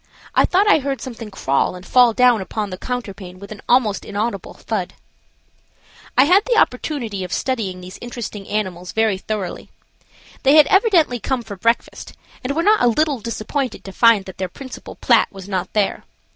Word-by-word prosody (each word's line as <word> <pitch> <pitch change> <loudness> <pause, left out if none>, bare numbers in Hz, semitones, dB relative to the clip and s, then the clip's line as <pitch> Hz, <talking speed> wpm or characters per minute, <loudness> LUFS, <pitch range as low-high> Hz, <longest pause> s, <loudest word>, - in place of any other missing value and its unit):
I - - +4
thought 390 +3 +2
I 415 - +5
heard 275 -1 -3
something 230 -4 -8
crawl 140 -4 0
and 180 0 -11
fall 245 +1 +5
down 245 -2 +4
upon 205 +1 -4
the 185 - -5
counterpane 200 -7 -6
with 200 +2 -12
an 210 - -9
almost 235 -5 +2
inaudible 205 -2 -4
thud. - - -4 1.2
I 260 - +8
had 365 +8 +5
the 485 -2 +1
opportunity 245 - 0
of 180 - -7
studying 200 -7 -2
these 180 +1 -10
interesting 235 -4 -7
animals 185 -4 -3
very 220 -3 +1
thoroughly. 205 -2 -5 0.7
They 275 +1 +4
had 305 -1 +8
evidently 360 - +3
come 250 +3 -2
for 210 -3 -8
breakfast, 230 +5 -1 0.3
and 275 +3 -2
were 330 - +1
not 425 +2 +4
a - - +4
little 285 +3 +1
disappointed 230 +3 -4
to 195 - -8
find 225 -1 +4
that 190 - -11
their 185 -1 -2
principal 260 +7 -10
plat - - +3
was 195 -1 -10
not 190 -3 -3
there. 210 -2 0
225 Hz, 180 wpm, -20 LUFS, 195-260 Hz, 1.2 s, I